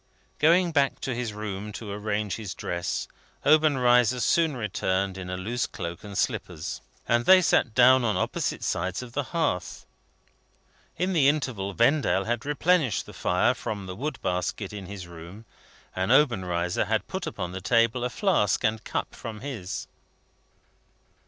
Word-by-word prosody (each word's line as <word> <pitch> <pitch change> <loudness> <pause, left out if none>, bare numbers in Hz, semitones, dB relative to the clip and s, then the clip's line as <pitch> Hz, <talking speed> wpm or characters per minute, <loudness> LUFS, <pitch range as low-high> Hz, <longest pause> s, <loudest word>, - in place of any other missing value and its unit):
Going 170 +3 +4
back 140 -3 +1
to 130 - -2
his 120 -2 -3
room 105 0 -5
to 105 -1 -7
arrange 105 0 -2
his 100 -5 -6
dress, 85 0 -3 0.4
Obenreizer 125 -6 +4
soon 160 +2 +2
returned 95 -3 -1
in 95 -1 -7
a 90 - -3
loose 115 +6 -2
cloak 85 -4 -6
and 100 -2 -7
slippers, 75 - -2 0.3
and 120 0 +2
they 190 +5 +8
sat 135 -9 +2
down 130 +1 +6
on 110 -3 +1
opposite - - -2
sides 95 +6 -2
of 120 -1 -11
the 145 0 -1
hearth. 145 - -2 1.1
In 185 +3 0
the 150 -6 +4
interval 115 -10 -2
Vendale 120 -5 +3
had 120 +3 -2
replenished 150 - +2
the - - -12
fire - - +2
from 100 -3 -5
the 95 0 -6
wood 145 +9 -4
basket 90 +3 -2
in 100 -3 -7
his 95 -2 -7
room, 85 +6 -11 0.5
and 95 +4 0
Obenreizer 95 - +2
had - - -1
put - - -4
upon 90 -1 -4
the 95 +1 -6
table 115 +5 +2
a 125 - 0
flask 145 - +1
and 110 0 0
cup - - -3
from 110 -2 -8
his. 115 -9 -5
110 Hz, 160 wpm, -26 LUFS, 95-135 Hz, 1.1 s, they